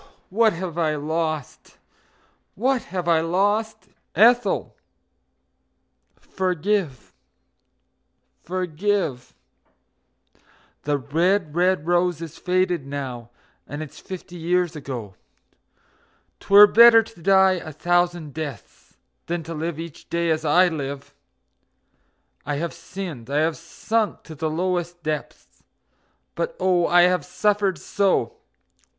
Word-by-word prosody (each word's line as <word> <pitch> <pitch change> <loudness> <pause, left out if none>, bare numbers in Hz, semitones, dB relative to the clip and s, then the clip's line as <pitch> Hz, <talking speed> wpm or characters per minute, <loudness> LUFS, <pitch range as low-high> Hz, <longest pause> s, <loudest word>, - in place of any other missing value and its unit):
Oh, - - -25 0.2
what 220 +2 +3
have 170 -1 -5
I 155 -2 +1
lost! 155 -1 -4 0.8
What 255 +3 0
have 180 -1 -4
I 165 -2 +4
lost! 205 +6 0 0.3
Ethel, 240 +3 +3 1.4
forgive, 185 - -2 1.3
forgive! 180 -5 -2 1.5
The 145 0 +1
red, 165 +4 0
red 180 -2 +2
rose 175 -1 +1
is 165 -3 -9
faded 180 -3 0
now, 130 -4 -6 0.4
and 145 +2 -5
it's 150 - -12
fifty 185 -1 -9
years 175 0 0
ago. 125 -9 -6 1.3
'Twere 200 +1 +8
better 230 +1 +7
to 225 -6 -16
die 190 0 +4
a 155 - -8
thousand 175 -1 0
deaths 155 -3 -8 0.3
than 170 0 -3
live 165 0 -4
each 165 -2 -9
day 170 -1 0
as 155 0 -1
I 175 +4 +4
live! 140 -4 -5 1.3
I 145 0 -3
have 170 +3 -3
sinned, 170 -11 -8
I 140 - -1
have 160 0 +1
sunk 215 +6 -2
to 160 - -10
the 155 +1 -3
lowest 175 +1 -2
depths 155 -1 -6 0.7
but - - -3
oh, 180 -2 +2
I 175 0 +5
have 180 0 +2
suffered 205 -3 0
so! 200 -1 0
175 Hz, 110 wpm, -23 LUFS, 155-190 Hz, 1.5 s, Twere